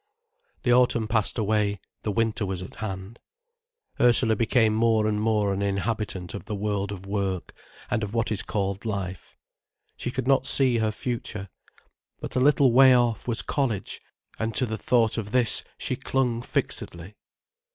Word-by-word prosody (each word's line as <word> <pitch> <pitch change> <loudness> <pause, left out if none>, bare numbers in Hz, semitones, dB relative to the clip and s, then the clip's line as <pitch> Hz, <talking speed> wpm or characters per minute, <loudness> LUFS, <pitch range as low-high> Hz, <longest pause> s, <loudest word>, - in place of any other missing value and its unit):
The 120 - +3
autumn 120 -3 +3
passed 110 0 0
away, 105 -2 0 0.2
the 105 - -2
winter 115 0 0
was 95 -2 -3
at 95 - -11
hand. 95 +1 -6 0.8
Ursula 120 -2 +4
became 110 0 +2
more 110 -1 +2
and 105 -1 0
more 105 -2 +1
an 95 - -3
inhabitant 100 -3 -2
of 100 - -7
the 105 - -4
world 100 -1 -2
of 95 -1 -7
work, 100 -2 -3 0.4
and 120 - +1
of 105 -2 -3
what 115 0 -1
is 105 - 0
called 100 -1 -3
life. 95 -5 -5 0.6
She - - -3
could - - -3
not 135 -1 +3
see 130 -4 +4
her 110 -1 +1
future, 110 -4 -5 0.7
but - - -7
a - - +3
little 140 -1 +4
way 130 +1 +7
off, 120 -3 +1
was 115 -2 -1
college, 115 -9 -2 0.4
and 110 0 -2
to 130 - +2
the 110 -2 -3
thought 115 +1 +1
of 105 -2 -5
this 120 -1 +3 0.2
she 130 - -2
clung 125 -2 -1
fixedly. 85 -4 -3
110 Hz, 165 wpm, -25 LUFS, 100-120 Hz, 0.8 s, way